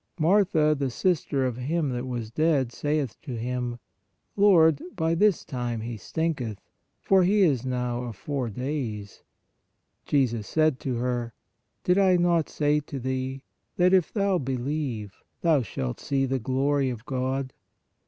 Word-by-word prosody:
Martha, 160 -3 +3
the 140 -2 -1
sis 175 +6 0
ter 135 -2 0
of 125 -2 -2
him 150 +4 -1
that 125 +1 -3
was 120 -3 -4
dead, 145 -3 +1
saith 145 -2 -2
to 125 - -6
Him: 120 +1 -3 0.6
Lord, 165 -7 +5
by 165 -1 +1
this 200 +2 +2
time 120 -4 -3
he 115 +1 -5
stinketh, 130 -4 -2 0.5
for 195 -1 +5
he 200 +3 +3
is 135 -7 +2
now 125 -1 -2
of 115 -3 -6
four 130 +4 -3
days. 115 -4 -4 0.9
Jesus 120 -7 +1
said 155 -4 +2
to 130 -2 -2
her: 120 -1 -2 0.5
Did 180 +2 +3
I 185 -2 +5
not 175 -2 +2
say 150 0 +1
to 145 -1 -7
thee, 130 +1 -3 0.3
that 180 +1 +4
if 185 -3 +3
thou 200 -3 +1
believe, 130 -5 -3 0.2
thou 160 -5 +3
shalt 65 - -4
see 135 -1 0
the 135 0 -1
glory 135 +3 +1
of 120 -1 -6
God? 130 0 -2
135 Hz, 155 wpm, -26 LUFS, 125-160 Hz, 0.9 s, Lord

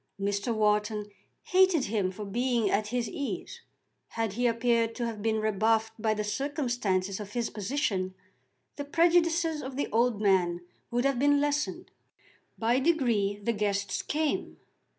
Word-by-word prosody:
Mr. 200 +3 -1
Wharton 210 -1 +1 0.3
hated 370 -5 +4
him 205 -3 0
for 210 +3 -7
being 235 0 0
at 210 +1 +1
his 240 +1 -1
ease. 355 - -5 0.5
Had 225 -3 -2
he 245 +3 +1
appeared 230 -1 +1
to 240 - -2
have 225 -3 -4
been 220 0 +1
rebuffed 220 +1 +1
by 215 -1 +1
the 210 - -2
circumstances 220 -7 -1
of 205 -1 -8
his 240 -1 -1
position 200 -4 -2 0.6
the 285 - -3
prejudices 330 0 +2
of 260 0 -6
the 285 - 0
old 230 -1 +2
man 180 -4 +2 0.3
would 245 +2 0
have 275 -3 +1
been 285 +1 +4
lessened. 290 +1 -1 0.7
By 235 +3 +2
degrees 235 -10 +1
the 235 - +1
guests 200 -2 -1
came. 305 0 -2
230 Hz, 150 wpm, -29 LUFS, 205-275 Hz, 0.7 s, hated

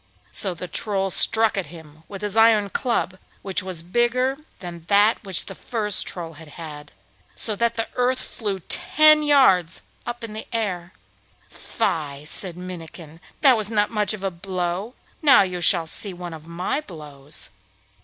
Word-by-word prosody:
So 190 -3 +3
the 180 +2 -7
Troll 195 +2 -1
struck 220 +4 +4
at 190 - -2
him 155 -1 -14
with 200 0 -9
his 205 0 +2
iron 220 -3 +4
club—which 195 -5 -3
was 185 -1 -3
still 165 +2 -4
bigger 250 +3 +1 0.2
than 175 -2 -9
that 205 +3 +3
which 190 -4 +1
the - - -6
first 210 -4 +1
Troll 165 -2 -5
had 160 +1 -14
had—so 150 - -7
that 235 +1 0
the 225 0 -2
earth 250 +1 0
flew 200 -4 -4
ten 305 - +5
yards 260 - +3 0.2
up 240 0 -5
in 225 -2 -6
the 215 - -7
air. 185 -6 -3 0.6
'Fie!' 150 -9 -3
said 175 +2 0
Minnikin. 165 -3 -10 0.2
'That 270 -4 +7
was 215 -2 +1
not 210 -2 0
much 210 -1 0
of 200 - -11
a 195 - -1
blow. 185 +4 -4 0.3
Now 285 -9 +6
you 180 -2 -4
shall 170 -2 +3
see 185 +4 +2
one 175 -1 -8
of 160 0 -11
my 180 - -3
blows. 150 - -6
190 Hz, 165 wpm, -22 LUFS, 170-225 Hz, 0.6 s, That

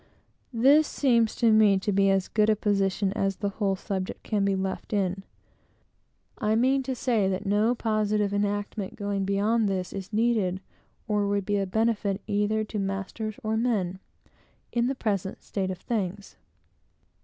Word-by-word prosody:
This 285 +6 +5
seems 235 -5 +2
to 230 -2 +3
me 215 -2 +5
to 205 +2 -1
be 195 0 +3
as 195 -1 +2
good 215 0 +2
a 215 - +4
position 195 -1 0
as 195 -2 0
the 200 0 -2
whole 200 -1 -1
subject 190 -1 -4
can 210 -3 0
be 195 0 +2
left 190 +2 -4
in. 195 -1 0 1.2
I 215 0 +1
mean 260 +4 +3
to 260 0 -3
say, 225 -6 +1
that 190 +2 -3
no 210 +4 +2
positive 215 -3 0
enactment, 205 -1 -2
going 200 -2 -2
beyond 205 +2 +1
this, 185 -2 -3
is 195 0 -6
needed, 215 -5 +1 0.5
or 210 -1 +1
would 200 -1 0
be 205 +1 0
a 195 - -1
benefit 215 -1 0
either 210 +1 0
to 215 0 -5
masters 195 +2 -3
or 220 0 0
men, 205 -6 0 0.7
in 240 0 +1
the 270 - -1
present 200 -6 -2
state 190 -2 -3
of 185 - -4
things. 200 -2 -4
205 Hz, 165 wpm, -27 LUFS, 195-220 Hz, 1.2 s, This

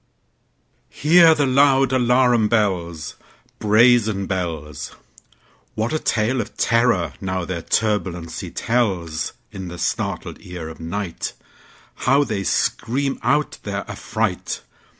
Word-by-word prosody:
Hear 165 +1 +5
the 145 -2 +2
loud 135 0 +4
alarum 125 -2 +3
bells, 90 -8 -1 0.4
Brazen 110 -2 +4
bells! 80 -6 -4 0.8
What 110 +5 -1
a 155 - +1
tale 120 +1 +1
of 105 - -9
terror, 115 - +2
now, 95 -2 -2
their 85 -2 -4
turbulency 95 -5 -1
tells! 95 -10 -1 0.2
In 95 -1 -7
the 90 0 -7
startled - - -3
ear 90 -3 -7
of 80 - -11
nightHow 105 - -3
they 105 -5 -2
scream 135 +8 0
out 150 0 0
their 100 -1 -4
affright! - - -3
105 Hz, 110 wpm, -21 LUFS, 90-125 Hz, 0.8 s, Hear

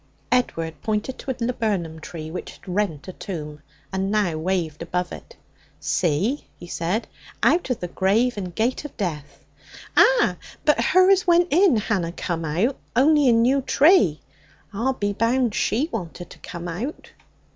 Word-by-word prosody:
Edward 165 - 0
pointed 215 +4 -2
to - - -8
a 260 - 0
laburnum 210 -9 -1
tree 155 -1 -7
which 180 - -6
had - - -19
rent 180 -5 -2
a 185 - -6
tomb, 150 -7 -7 0.3
and 190 0 -1
now 205 -6 +1
waved 165 -2 -2
above 180 0 -2
it. - - -10 0.4
'See,' 190 - 0
he - - -10
said. 175 +6 -2 0.4
'Out 345 -5 +3
of 250 - -2
the 180 - -2
grave 210 +8 +1
and 180 -4 -6
gate 240 +5 0
of 295 - -9
death 160 -9 -5 0.3
' - - -16
'Ah! - - +5 0.3
But 300 - +4
her 370 +1 +5
as 380 -1 +3
went 345 0 +4
in 340 - +5
hanna 195 -5 -1
come 170 -2 -3
out. 185 - 0 0.2
On'y 290 +2 +5
a - - +6
new 245 +4 +3
tree. 265 - +4 0.5
I'll 240 +6 0
be 205 -5 -2
bound 230 +2 +1
she 250 +9 +1
wanted 175 -4 -6
to - - -13
come 170 0 -7
out.' 215 - -5
205 Hz, 170 wpm, -23 LUFS, 175-255 Hz, 0.5 s, a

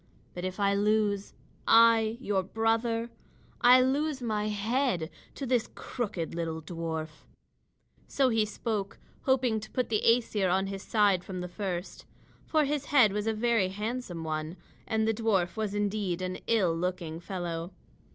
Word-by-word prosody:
But 180 - -6
if 185 +2 -4
I 200 0 +3
lose, 205 0 +1 0.3
I, 225 0 +5
your 205 -6 0
brother, 225 +3 0 0.5
I 250 +1 +8
lose 280 +2 +1
my 215 -4 -1
head 215 - 0 0.2
to 275 - -4
this 245 -3 +1
crooked 200 -9 -4
little 165 -1 -3
dwarf." 160 -1 -5 0.8
So 270 -2 +2
he 225 -2 +2
spoke, 210 -1 -3 0.3
hoping 255 -4 +2
to 215 - -10
put 255 -2 -1
the 215 -2 +1
Æsir 220 -5 +3
on 190 +1 +2
his 195 0 -5
side 200 -5 +2
from 185 -1 -6
the 180 - -4
first. 180 -1 -5 0.4
For 310 -2 +3
his 285 0 -1
head 245 -10 +5
was 210 +1 -2
a - - +3
very 225 -3 +2
handsome 210 -3 -4
one, 155 +2 -3 0.3
and 220 0 +1
the 225 - +2
dwarf 205 -6 0
was 215 -2 -2
indeed 200 -3 -1
an 185 0 -3
ill 190 -8 +2
looking 170 -2 -3
fellow. 175 -1 -4
210 Hz, 155 wpm, -29 LUFS, 180-230 Hz, 0.8 s, I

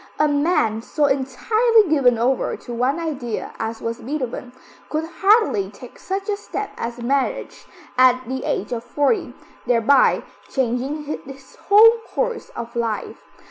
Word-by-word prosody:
A 300 - +3
man 285 -7 +1
so 295 +5 0
entirely 425 - +2
given 270 -6 +3
over 250 +3 0
to 240 - -9
one 255 +6 0
idea, 270 -9 -4
as 225 0 -4
was 230 0 -3
Beethoven, 255 -2 -4 0.4
could 310 +1 -1
hardly 390 - +3
take 225 +4 -13
such 390 +1 -4
a 410 -1 -1
step 415 0 -5
as 235 +1 -5
marriage 280 - -2 0.3
at 255 0 +5
the 260 +1 -4
age 205 - -2
of 230 -1 -3
forty, 290 - 0 0.3
thereby 245 +3 +4 0.3
changing 265 +4 -1 0.2
his 270 -1 -12
whole 455 +3 +7
course 485 -2 -2
of 235 0 -7
life. 225 -3 -3
270 Hz, 140 wpm, -21 LUFS, 240-335 Hz, 0.4 s, whole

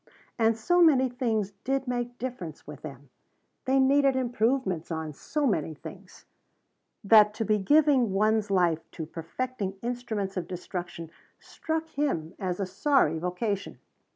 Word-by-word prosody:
And 225 0 +3
so 350 +10 +2
many 265 -6 +5
things 225 -5 -1
did 270 0 -1
make 245 0 -3
difference 210 - -6
with 150 -1 -10
them 140 -3 -10 0.5
they 265 +1 +3
needed 275 0 +4
improvements 240 - 0
on 160 -2 -4
so 295 - -2
many 160 - 0
things - - -12 0.8
that 210 0 +6
to 225 - -2
be 215 0 +2
giving 280 0 +4
one's 215 +1 +2
life 175 -4 +1
to 160 - -5
perfecting 195 +5 -4
instruments 225 -5 -3
of 175 -2 -3
destruction 175 -2 -6 0.3
struck 320 0 -4
him 270 - -2
as 185 -2 -2
a 195 - 0
sorry 185 - +2
vocation. 190 +4 -3
215 Hz, 140 wpm, -27 LUFS, 180-255 Hz, 0.8 s, that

